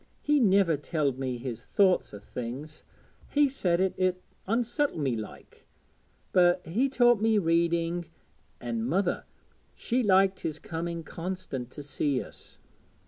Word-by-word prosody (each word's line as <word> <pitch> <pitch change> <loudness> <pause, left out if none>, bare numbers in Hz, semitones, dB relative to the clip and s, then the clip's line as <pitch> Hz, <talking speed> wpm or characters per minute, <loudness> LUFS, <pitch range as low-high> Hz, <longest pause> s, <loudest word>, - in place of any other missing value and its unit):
He 295 0 +3
niver 195 - +4
telled 145 -3 -1
me 130 -2 -2
his 120 -1 -6
thoughts 190 +2 +2
o' 105 - -8
things 125 +8 -7 0.5
he 290 0 +4
said 180 -11 0
it 190 0 +1
'ud 185 -1 +3 0.3
unsettle 240 - 0
me 135 -6 0
like 110 -2 -10 0.6
but 180 0 +4
he 225 - +1
taught 240 -4 +4
me 220 0 +3
reading; 170 -1 +1 0.5
an' 115 -2 -3
mother, 175 - 0 0.5
she 250 +2 0
liked 195 -3 +4
his 155 -2 -3
coming 165 +1 -5
constant 170 -8 -5
to 145 - -8
see 140 -1 -1
us. - - -11
170 Hz, 140 wpm, -28 LUFS, 140-200 Hz, 0.6 s, niver